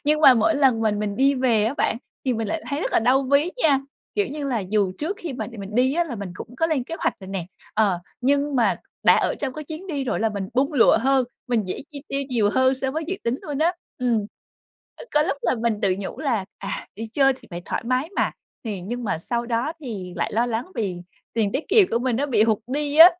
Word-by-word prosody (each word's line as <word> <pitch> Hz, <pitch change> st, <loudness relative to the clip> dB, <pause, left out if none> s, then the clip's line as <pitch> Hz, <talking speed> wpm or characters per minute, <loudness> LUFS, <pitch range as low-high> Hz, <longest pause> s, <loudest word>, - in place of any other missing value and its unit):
Nhưng 305 Hz, +1 st, +3 dB
mà 265 Hz, -4 st, +9 dB
mỗi 235 Hz, +8 st, +3 dB
lần 265 Hz, -5 st, +3 dB
mình 215 Hz, -2 st, +1 dB
mình 205 Hz, -1 st, -2 dB
đi 275 Hz, +1 st, +4 dB
về 240 Hz, -5 st, +2 dB
á 235 Hz, +6 st, 0 dB
bạn, 225 Hz, -, +1 dB, 0.3 s
thì 255 Hz, -, +2 dB
mình 225 Hz, -2 st, -2 dB
lại 325 Hz, -, -2 dB
thấy 285 Hz, -, -1 dB
rất -, -, -2 dB
là -, -, +5 dB
đau 255 Hz, +4 st, +3 dB
ví 280 Hz, +5 st, +3 dB
nha. 280 Hz, -4 st, +4 dB, 0.3 s
Kiểu 410 Hz, -1 st, +2 dB
như 295 Hz, 0 st, -5 dB
là 245 Hz, -, 0 dB
dù 195 Hz, 0 st, +1 dB
trước 360 Hz, +7 st, -2 dB
khi 335 Hz, -5 st, -4 dB
mà 255 Hz, -, -4 dB
mình 200 Hz, +1 st, -7 dB
đi 260 Hz, +3 st, +3 dB
á 345 Hz, +1 st, +2 dB
là 290 Hz, -7 st, -5 dB
mình 200 Hz, -3 st, -6 dB
cũng 245 Hz, +5 st, -9 dB
có 325 Hz, -, +2 dB
lên 290 Hz, -6 st, 0 dB
kế 330 Hz, -, -5 dB
hoạch -, -, 0 dB
rồi 190 Hz, -, -9 dB
nè, 190 Hz, -3 st, -3 dB, 0.3 s
ờ, 205 Hz, -5 st, +3 dB, 0.2 s
nhưng 280 Hz, +2 st, +2 dB
mà 235 Hz, -, +3 dB, 0.3 s
đã -, -, +7 dB
ở -, -, +1 dB
trong 270 Hz, -3 st, -3 dB
cái 305 Hz, +2 st, -7 dB
chuyến 315 Hz, +5 st, -7 dB
đi 290 Hz, -7 st, -2 dB
rồi 250 Hz, -, -1 dB
là 225 Hz, -, +3 dB
mình 200 Hz, -2 st, -4 dB
bung 275 Hz, +4 st, +2 dB
lụa 255 Hz, -6 st, +6 dB
hơn, 265 Hz, +1 st, +3 dB, 0.2 s
mình 235 Hz, -4 st, +1 dB
dễ -, -, -4 dB
chi 280 Hz, -1 st, -7 dB
tiêu 275 Hz, 0 st, -1 dB
nhiều 225 Hz, -6 st, +2 dB
hơn 260 Hz, +3 st, +3 dB
so 265 Hz, 0 st, -2 dB
với 315 Hz, +4 st, -2 dB
dự 375 Hz, -, -1 dB
tính 235 Hz, +3 st, 0 dB
luôn 290 Hz, -2 st, -4 dB
á. 330 Hz, +3 st, +3 dB, 0.3 s
Ừm. 235 Hz, -4 st, +1 dB, 0.7 s
Ừ, -, -, -9 dB
có 300 Hz, -, +5 dB
lúc 285 Hz, -, -1 dB
là -, -, +2 dB
mình 230 Hz, -2 st, 0 dB
tự 190 Hz, -2 st, +3 dB
nhủ 195 Hz, -, -5 dB
là 240 Hz, -10 st, 0 dB
"À, 195 Hz, -, -5 dB
đi 225 Hz, +2 st, -5 dB
chơi 270 Hz, 0 st, +4 dB
thì -, -, -18 dB
phải 175 Hz, 0 st, -6 dB
thoải -, -, -3 dB
mái 255 Hz, +5 st, 0 dB
mà!", -, -, +2 dB, 0.3 s
thì 210 Hz, -5 st, -3 dB
nhưng 240 Hz, +7 st, -4 dB
mà 195 Hz, -, -1 dB
sau 235 Hz, +7 st, -2 dB
đó 235 Hz, +6 st, 0 dB
thì 205 Hz, -, -6 dB
lại -, -, -1 dB
lo 230 Hz, +3 st, +2 dB
lắng 235 Hz, 0 st, -1 dB
vì 190 Hz, -5 st, -2 dB, 0.3 s
tiền 215 Hz, -3 st, +1 dB
tiết 275 Hz, -, -2 dB
kiệm 415 Hz, -5 st, +6 dB
của 230 Hz, -, +2 dB
mình 245 Hz, -2 st, 0 dB
nó 285 Hz, -, 0 dB
bị 230 Hz, -7 st, +3 dB
hụt 220 Hz, -2 st, +3 dB
đi 290 Hz, +2 st, -2 dB
á. 330 Hz, +3 st, +11 dB
250 Hz, 265 wpm, -24 LUFS, 220-285 Hz, 0.7 s, á